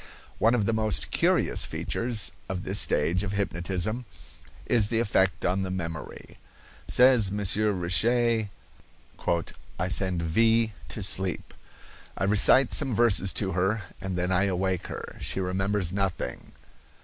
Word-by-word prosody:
One 115 +2 +4
of 110 -4 0
the 115 - 0
most 110 -3 0
curious - - +1
features 115 -9 -3 0.2
of 95 0 -4
this 95 +2 +2
stage 90 +2 +2
of 100 -1 -4
hypnotism 100 +4 -2 0.6
is 110 -4 +3
the 115 +1 0
effect 95 -4 +1
on 95 +2 +1
the 95 - -3
memory. 85 -4 -7 0.5
Says 125 -6 +4
Monsieur 105 +1 +1
Richet: 110 +5 +1 1.3
"I 90 - -1
send 90 -2 0
V——— 110 +6 +2 0.2
to 105 - -5
sleep. 95 -2 -2 0.6
I - - -2
recite 105 +7 +4
some 135 -6 +2
verses 100 -5 +4
to 95 -3 0
her, 95 +4 0 0.2
and 95 -1 -4
then 90 +1 -1
I 95 +2 +2
awake 95 -1 -1
her. - - -8
She - - -3
remembers 95 0 0
nothing. 95 -10 -3
100 Hz, 135 wpm, -26 LUFS, 90-110 Hz, 1.3 s, One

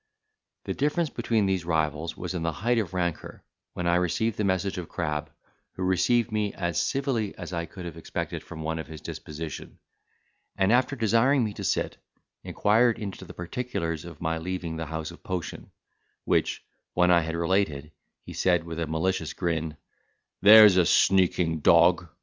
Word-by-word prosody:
The - - -2
difference 150 +2 0
between 115 -3 0
these 95 -3 0
rivals 80 -1 -1
was 90 0 -5
in 90 - -3
the 85 0 0
height 115 +9 0
of 105 -5 -3
rancour, 85 -4 -3 0.3
when 90 - -4
I 85 0 +3
received 95 +5 0
the 105 - -2
message 95 -1 0
of 85 - -7
Crab, 75 -3 -3 0.4
who 95 - -5
received 95 +6 +2
me 105 -2 -1
as 85 -3 -1
civilly 130 -7 -1
as 85 -1 -7
I 85 -1 -3
could 90 -3 -9
have 85 -2 -7
expected 80 - -4
from 80 -2 -9
one 80 +1 -2
of 80 - -6
his 80 0 -9
disposition; 75 0 -7 0.8
and, 95 +2 +3
after 125 +3 +3
desiring 115 +4 +3
me 105 -2 -2
to - - -7
sit, - - -1 0.5
inquired 115 +3 +2
into 100 -4 -6
the - - -12
particulars 85 -4 -4
of 85 -4 -11
my 80 0 -1
leaving 90 -1 -4
the 80 -1 -4
house 80 +1 -5
of 85 - -14
Potion; 90 -3 -5 0.6
which - - 0 0.3
when 90 0 +4
I 85 - +6
had 80 0 -4
related, 85 -4 0 0.3
he - - -9
said, 90 -3 +2
with 85 0 -6
a 85 - -2
malicious 80 +5 -1
grin, 80 -3 -2 0.6
"There's 105 -1 +9
a 90 - +5
sneaking 90 -4 +3
dog! 85 +3 +4
90 Hz, 175 wpm, -26 LUFS, 80-105 Hz, 0.8 s, There's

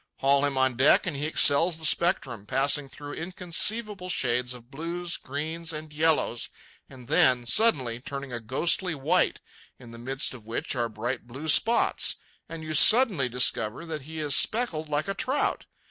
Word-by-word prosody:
Haul 140 +1 +2
him 140 -2 -2
on 130 -2 +1
deck, 135 +3 +4
and 175 -5 -3
he 145 +2 -3
excels 160 +2 +4
the 160 - -5
spectrum, 130 - 0
passing 140 +2 +1
through 145 +1 -10
inconceivable 185 +3 -1
shades 125 -4 0
of 120 +1 -15
blues, 170 +4 -4
greens, 160 +4 -5
and 155 -1 -9
yellows, 155 -6 0 0.4
and 125 -3 -14
then, 125 -4 +3
suddenly, 130 - +2
turning 140 0 -7
a 120 - -3
ghostly 160 +9 -1
white, 135 - 0 0.4
in 120 -2 -14
the 115 - -12
midst 135 +3 -1
of 125 -4 -12
which 115 +4 -3
are 120 -2 -1
bright 120 +3 -5
blue 135 +6 -8
spots, 225 +9 +3 0.3
and 165 -1 -8
you 155 0 -5
suddenly 190 - +4
discover 120 +2 -1
that 160 -2 -6
he 160 +4 -10
is 150 -3 +2
speckled 175 -10 +1
like 150 +3 -2
a 195 - -2
trout. 265 +7 -2
145 Hz, 170 wpm, -26 LUFS, 125-165 Hz, 0.4 s, deck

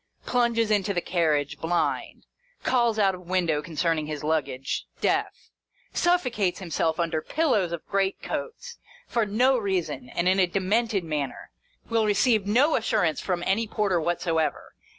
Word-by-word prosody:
Plunges 235 -3 +1
into 200 -1 +1
the - - +2
carriage, 155 -5 0
blind. 170 +2 -1 0.4
Calls 235 -3 +2
out 195 -3 +3
of 180 -1 -10
window 170 -5 +1
concerning 160 0 -1
his 150 -1 -5
luggage, 145 -4 -2
deaf. - - -1 0.4
Suffocates 250 - +1
himself 165 -3 -1
under 165 -2 0
pillows 245 - +1
of 170 -2 -5
great 195 -1 0
coats, 480 0 -6 0.3
for 230 - 0
no 250 +5 +3
reason, 170 - -2
and 170 +5 -1
in 190 +1 +3
a 185 - +4
demented 200 +3 0
manner. 150 -4 -4 0.4
Will 225 -2 +1
receive 210 0 +2
no 260 +9 +4
assurance 215 - +1
from 175 -2 -2
any 220 +4 +1
porter 205 -5 0
whatsoever. 165 -2 -1
190 Hz, 145 wpm, -26 LUFS, 165-225 Hz, 0.4 s, a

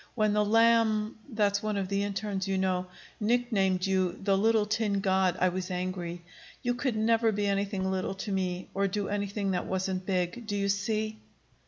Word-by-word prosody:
When 215 -3 +2
the 210 0 +3
Lamb 225 0 +3 0.2
that's 205 -2 +1
one 215 -1 -1
of 195 -1 -1
the 200 +1 0
internes, 200 -1 -2
you 195 0 0
know 185 -1 0 0.3
nicknamed 210 -5 +1
you 190 -2 +1
the 195 0 +2
'Little 220 +1 +3
Tin 210 -2 0
God,' 190 -2 +2
I 185 - +4
was 185 +1 -4
angry. 180 -1 -4 0.4
You 245 -1 +1
could 245 -1 -1
never 225 +1 +3
be 205 0 -1
anything 195 -1 0
little 190 0 -2
to 200 +2 -5
me, 185 -1 -2
or 195 +1 +1
do 200 +1 -2
anything 200 -1 -1
that 180 -1 -1
wasn't 190 0 -2
big. 185 +4 -1
Do 205 - -2
you 200 0 0
see?" 215 +2 -1
200 Hz, 185 wpm, -29 LUFS, 190-215 Hz, 0.4 s, I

